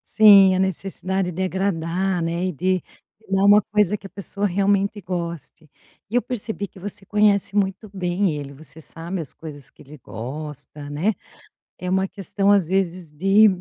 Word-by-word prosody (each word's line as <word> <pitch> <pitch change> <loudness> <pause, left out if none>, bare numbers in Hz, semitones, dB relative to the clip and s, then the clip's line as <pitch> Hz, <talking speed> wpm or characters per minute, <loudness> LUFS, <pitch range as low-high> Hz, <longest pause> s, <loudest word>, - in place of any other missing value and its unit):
Sim, 200 -3 +8
a - - 0
necessidade 190 0 -1
de 180 +2 -4
agradar, 185 -1 -1
né, 170 +1 -1
e - - -1
de, 185 +3 0 0.5
dar 195 0 +2
um 205 +1 +7
coisa 210 -1 +3
que 200 - -17
a - - -7
pessoa 200 +1 -4
realmente 200 +2 +1
goste. 170 -5 -6 0.4
E 225 - -4
eu 245 - +4
percebi 220 -4 -4
que - - -19
você 195 +1 -7
conhece 205 -1 +2
muito 200 +1 0
bem 185 +1 0
ele, 140 -1 -6
você 155 +3 -5
sabe 170 +3 -6
as 150 - -9
coisas 145 -4 -10
que - - -20
ele 150 +2 -13
gosta, 145 +4 -7
né, 160 +10 0 0.7
é 180 - -4
uma 190 +1 +1
questão 195 +1 0
as 200 -5 +4
vezes 180 -3 -1
de 195 +8 +5
190 Hz, 170 wpm, -22 LUFS, 165-200 Hz, 0.7 s, Sim